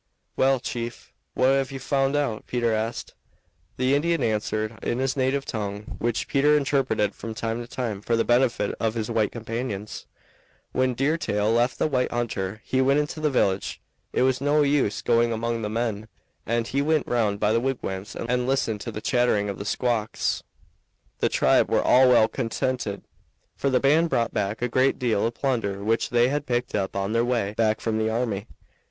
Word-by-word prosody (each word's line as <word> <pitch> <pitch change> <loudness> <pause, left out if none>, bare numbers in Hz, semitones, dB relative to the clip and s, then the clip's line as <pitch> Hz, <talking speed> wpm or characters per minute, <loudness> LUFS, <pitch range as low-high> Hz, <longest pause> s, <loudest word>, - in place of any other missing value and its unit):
"Well, 135 0 +3
chief, 120 -1 -6 0.2
what 130 - +3
have 135 0 +1
you 135 - -5
found 135 +1 0
out?" 140 -7 -1
Peter 120 -2 0
asked. 110 +2 -3 0.6
The 130 +1 +2
Indian 160 0 +1
answered 110 0 -1
in 120 - -1
his 130 0 0
native 135 +1 0
tongue, 105 -2 -5
which 115 -3 -1
Peter 150 +2 +4
interpreted 130 -7 +1
from 110 +2 -7
time 115 +1 -2
to 120 - -8
time 115 -5 -4
for 115 +2 0
the 115 - +1
benefit 120 -4 +2
of 110 0 0
his 115 0 -3
white 110 -2 +1
companions: 115 -2 -5 0.6
"When 130 -1 +1
Deer 145 +6 +1
Tail 105 -5 0
left 120 +2 +2
the - - +1
white 130 -5 +1
hunter 110 -3 -3
he 130 - 0
went 135 +2 +3
into 150 +1 -3
the 155 -1 +1
village. 100 -8 0 0.3
It - - +1
was 130 0 +1
no 145 +1 +3
use 140 -7 +1
going 120 0 +3
among 115 +1 -2
the 105 - -2
men, 110 -1 -2 0.4
and 115 +1 0
he 140 +4 -1
went 155 0 +1
round 105 -4 0
by 105 +1 +2
the 115 - +3
wigwams 105 -7 -3
and 125 +1 -1
listened 115 -6 0
to - - -5
the 105 - -6
chattering 120 -5 +1
of 100 - -5
the 100 - -5
squaws. 115 0 -1 0.8
The - - +2
tribe - - +3
were - - +2
all 130 0 +6
well 120 -3 +6
contented, 125 -4 -2 0.5
for 140 - 0
the 130 - +3
band 155 +5 +3
brought 115 -4 0
back 105 +2 -2
a - - +2
great 130 +2 +2
deal 115 -4 +1
of 115 - -5
plunder 110 -7 -1
which 115 +2 +1
they 120 0 +3
had 145 +1 -2
picked 120 0 -1
up 95 -2 -1
on 100 +2 -1
their 115 0 +2
way 120 -5 0
back 110 -1 +1
from 110 -1 -1
the 110 0 +1
army. 110 -3 -2
120 Hz, 195 wpm, -25 LUFS, 110-130 Hz, 0.8 s, all